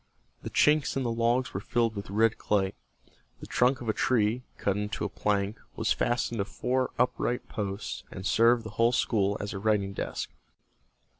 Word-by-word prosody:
The - - -5
chinks 150 -2 +3
in 135 - 0
the 120 - 0
logs 120 +2 +1
were 95 - -2
filled 115 +1 0
with 100 -2 -6
red 110 +2 +2
clay. 95 -2 +1 0.7
The - - -8
trunk 125 +2 +2
of 120 - -6
a 110 - +2
tree, 115 0 +2 0.2
cut 100 - 0
into 105 +1 -2
a - - -2
plank, 100 +1 -1 0.2
was - - +1
fastened 120 -1 0
to 100 - +1
four 130 +4 -1
upright 125 0 0
posts, 100 -1 -4
and 95 - -8
served 115 +2 +4
the 110 - -7
whole 120 +1 +5
school 100 -4 +1
as 100 +1 -4
a 95 - -4
writing 100 -2 +1
desk. - - -4
110 Hz, 180 wpm, -28 LUFS, 100-120 Hz, 0.7 s, whole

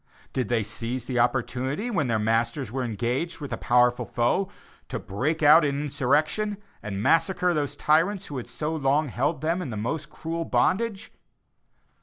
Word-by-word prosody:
Did 125 -5 -1
they 115 -2 +2
seize 115 +4 -4
the 125 -1 -1
"opportunity" 130 - 0
when 165 - +1
their 115 -2 +1
masters 115 +3 0
were 130 +1 -2
engaged 120 - -2
with 145 -3 -5
a - - -2
powerful 125 0 +3
foe, 125 +11 +1 0.4
to - - -3
break 145 +11 -2
out 150 +3 +8
in 140 -1 0
insurrection, 150 +9 0 0.2
and 100 -1 -4
massacre 175 +4 +3
those 145 -3 -1
tyrants 170 +6 +2
who 145 - -6
had 125 - -5
so 155 +1 -3
long 145 0 +1
held 145 +7 -1
them 165 +4 0
in 175 - -4
the 110 - -4
most 150 +8 -3
cruel 165 +2 -4
bondage? 200 +5 0
140 Hz, 170 wpm, -26 LUFS, 120-165 Hz, 0.4 s, out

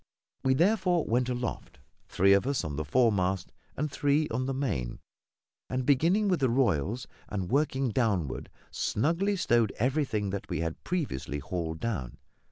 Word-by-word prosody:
We 130 0 +3
therefore 180 0 +2
went 125 +2 +1
aloft, 125 0 -4 0.3
three 100 +1 +4
of 100 +6 +3
us 140 -2 0
on 75 -2 -4
the 75 - -2
foremast, 95 - +1 0.3
and 150 +1 -1
three 145 +2 +2
on 130 +3 -1
the - - 0
main, 70 - -2 0.7
and 130 0 -1
beginning 165 +10 +3
with 180 -3 +2
the 130 -2 +2
royals 115 - +1 0.2
and 95 -3 -3
working 135 -2 +1
downward, 100 - 0 0.2
snugly 170 - 0
stowed 120 - +2
everything 125 -5 0
that 100 0 -5
we - - -1
had 80 -1 -4
previously 135 - -2
hauled 80 +2 -4
down. 95 - -3
125 Hz, 155 wpm, -29 LUFS, 95-145 Hz, 0.7 s, three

